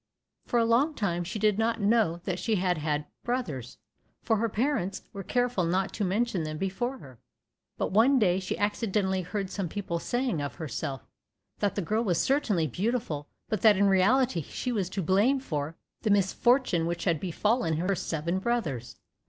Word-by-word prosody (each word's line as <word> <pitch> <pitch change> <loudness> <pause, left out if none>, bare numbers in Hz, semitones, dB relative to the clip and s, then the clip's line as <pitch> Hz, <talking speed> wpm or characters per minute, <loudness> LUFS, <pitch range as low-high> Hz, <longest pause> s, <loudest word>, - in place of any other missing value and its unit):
For 240 - +1
a 230 - +4
long 265 +7 +3
time 175 -6 -1
she 185 +5 -5
did 210 0 +2
not 230 +1 +1
know 205 -5 +2
that 180 -1 -2
she 225 - 0
had 180 -3 +1
had 150 -1 -1 0.2
brothers, 155 - -3 0.5
for 225 -1 +2
her 230 +2 0
parents 215 -5 -1
were 200 - -5
careful 245 -1 0
not 185 +4 0
to 215 - -2
mention 200 0 0
them 155 0 -4
before 215 +9 -2
her, 130 - -14 0.6
but - - -1
one 235 +8 +5
day 190 -6 +3
she 185 - -3
accidentally 205 -2 0
heard 190 +2 -4
some 195 -4 -3
people 175 -3 -3
saying 245 - -1
of 140 -4 -4
herself, 135 -3 -4 0.5
"that 205 - 0
the 200 - -1
girl 215 +7 0
was 180 -7 +1
certainly 220 - +2
beautiful, 175 - -2 0.2
but 215 - -2
that 215 -3 +6
in 200 - +4
reality 200 +2 +3
she 250 - -4
was 200 -6 -1
to 190 0 -3
blame 205 - +3
for 155 - -3 0.3
the 215 - 0
misfortune 200 -1 +3
which 170 0 -3
had 170 -5 +1
befallen 190 - 0
her 180 +4 +1
seven 170 0 -2
brothers." 190 - -2
195 Hz, 180 wpm, -28 LUFS, 170-230 Hz, 0.6 s, that